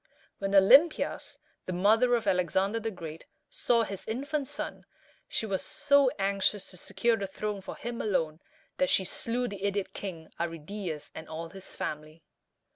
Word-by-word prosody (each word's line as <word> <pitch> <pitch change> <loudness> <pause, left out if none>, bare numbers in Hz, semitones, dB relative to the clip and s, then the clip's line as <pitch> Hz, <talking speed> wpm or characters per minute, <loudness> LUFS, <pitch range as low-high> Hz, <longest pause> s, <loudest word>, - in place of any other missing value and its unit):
When 195 0 0
Olympias, 270 - +5 0.3
the 185 - -2
mother 220 +7 +4
of 230 - -1
Alexander 190 +4 +2
the 225 0 -2
Great, 165 -5 -8 0.3
saw 235 -1 +2
his 200 -3 -6
infant 275 +5 -2
son, - - -6 0.4
she - - 0
was 195 -3 -1
so 280 -2 +3
anxious 195 0 +1
to 180 - -7
secure 235 +6 +1
the 200 -2 -3
throne 205 +1 -4
for - - -7
him 235 0 -4
alone, 160 -7 0 0.4
that 275 - +2
she 190 - +4
slew 240 +6 -2
the 200 -3 -7
idiot 200 -1 -1
king 170 -5 -6
Arridæus 165 0 -4
and 160 0 -8
all 165 +1 -5
his 190 0 -10
family. 155 +1 -5
195 Hz, 160 wpm, -30 LUFS, 175-230 Hz, 0.4 s, Olympias